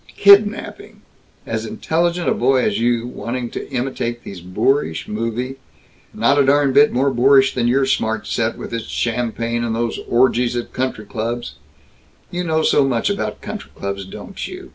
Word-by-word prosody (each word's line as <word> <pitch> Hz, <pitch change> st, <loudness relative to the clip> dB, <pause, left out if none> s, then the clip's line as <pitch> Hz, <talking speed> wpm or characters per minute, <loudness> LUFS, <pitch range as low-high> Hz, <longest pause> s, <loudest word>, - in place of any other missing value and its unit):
Kidnapping! 205 Hz, +1 st, +3 dB, 0.4 s
As 110 Hz, -1 st, -3 dB
intelligent 170 Hz, +6 st, -1 dB
a -, -, +3 dB
boy 130 Hz, +1 st, +2 dB
as 105 Hz, 0 st, 0 dB
you 120 Hz, 0 st, +1 dB
wanting 120 Hz, 0 st, -5 dB
to -, -, -6 dB
imitate 125 Hz, -2 st, -3 dB
these 95 Hz, -3 st, -9 dB
boorish 105 Hz, -, 0 dB
movie 115 Hz, +4 st, -3 dB, 0.3 s
" -, -, -32 dB
"Not 140 Hz, +1 st, +2 dB
a -, -, +6 dB
darn 140 Hz, 0 st, +3 dB
bit 145 Hz, +2 st, +6 dB
more 135 Hz, +3 st, +1 dB
boorish 135 Hz, +2 st, +4 dB
than 120 Hz, -2 st, 0 dB
your 135 Hz, +3 st, +3 dB
smart 110 Hz, -4 st, 0 dB
set, 115 Hz, -1 st, -1 dB
with -, -, -8 dB
its 115 Hz, -1 st, -4 dB
champagne 120 Hz, 0 st, -1 dB
and 115 Hz, -1 st, -1 dB
these 115 Hz, 0 st, -2 dB
orgies 125 Hz, 0 st, +2 dB
at 120 Hz, -, -4 dB
country 130 Hz, -4 st, -3 dB
clubs 110 Hz, -4 st, -4 dB, 0.4 s
" -, -, -34 dB
"You 180 Hz, 0 st, -2 dB
know 160 Hz, -2 st, 0 dB
so 145 Hz, -, +4 dB
much 125 Hz, -, 0 dB
about 105 Hz, -, -3 dB
country -, -, -7 dB
clubs, 100 Hz, 0 st, -4 dB
don't 95 Hz, -, -8 dB
you! -, -, -9 dB
120 Hz, 175 wpm, -19 LUFS, 115-135 Hz, 0.4 s, a